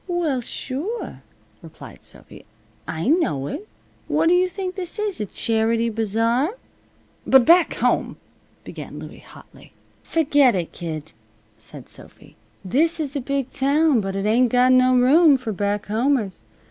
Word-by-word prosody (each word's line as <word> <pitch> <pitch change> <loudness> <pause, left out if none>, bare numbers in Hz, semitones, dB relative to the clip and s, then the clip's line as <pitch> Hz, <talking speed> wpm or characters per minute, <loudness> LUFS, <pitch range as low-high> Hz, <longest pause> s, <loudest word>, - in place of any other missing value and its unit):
"Well, 335 -8 -1
sure," 295 - -6 0.4
replied - - -13
Sophy. - - -13 0.4
"I 160 +1 -4
know 295 - +1
it. 355 - -6 0.4
What 330 - +2
do - - +4
you 365 +1 +3
think 365 0 -5
this 370 -1 -6
is? 420 - -2
A 210 - -3
charity 225 +2 0
bazaar?" 230 - 0 0.7
"But 265 -2 +6
back 345 +1 +4
home - - 0 0.2
" - - -36
began - - -9
Louie, - - -10
hotly. - - -17 0.3
"Ferget 285 -7 +2
it, 175 -3 -3
kid," 160 -2 -7 0.4
said - - -13
Sophy. - - -15 0.3
"This 320 - +1
is 295 -2 -3
a 280 - -2
big 275 0 -3
town, 280 -1 +2
but 195 -1 -4
it 195 +1 -2
ain't 235 +4 +3
got 250 +1 +4
no 255 0 +4
room 285 +4 +5
for 250 -3 -5
back 205 +1 -2
homers. 220 - -1
255 Hz, 150 wpm, -22 LUFS, 220-320 Hz, 0.7 s, But